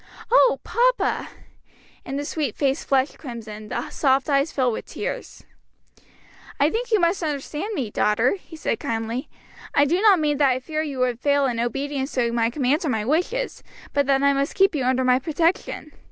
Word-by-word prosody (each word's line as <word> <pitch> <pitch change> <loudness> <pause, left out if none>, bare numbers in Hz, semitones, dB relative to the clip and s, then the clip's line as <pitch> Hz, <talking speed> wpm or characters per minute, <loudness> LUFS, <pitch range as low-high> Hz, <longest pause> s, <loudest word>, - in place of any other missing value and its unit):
"Oh, - - +5
papa!" - - +1 0.7
And 270 - -4
the 290 - -3
sweet 290 -6 -2
face 275 +1 0
flushed 270 0 0
crimson, 220 -5 -8
the 240 - -4
soft 270 +1 +1
eyes 280 +3 +2
filled 255 -4 +1
with - - -6
tears. - - -6 1.2
"I 290 +3 +3
think 475 +1 -3
you 435 - +4
misunderstand 335 +2 -1
me, 245 - -3
daughter," 210 +5 +2
he 340 - -13
said 300 -7 -2
kindly; 225 +3 -3 0.5
"I 285 - +5
do 345 +6 +1
not 410 -5 +6
mean 295 -2 +1
that 280 -2 +5
I 255 0 +1
fear 310 +4 -3
you 290 -4 -4
would 250 -2 0
fail 285 +1 +2
in 240 -3 -1
obedience 275 +4 -2
to 240 -2 +1
my 230 -1 +1
commands 275 +4 0
or 310 - -1
my 220 -4 -1
wishes; 360 - -1 0.3
but 285 -1 +1
that 275 0 +3
I 280 0 +5
must 275 +1 -1
keep 390 -1 +4
you 275 -5 -1
under 260 0 +2
my 255 0 +4
protection. 320 +1 -1
280 Hz, 185 wpm, -23 LUFS, 250-315 Hz, 1.2 s, not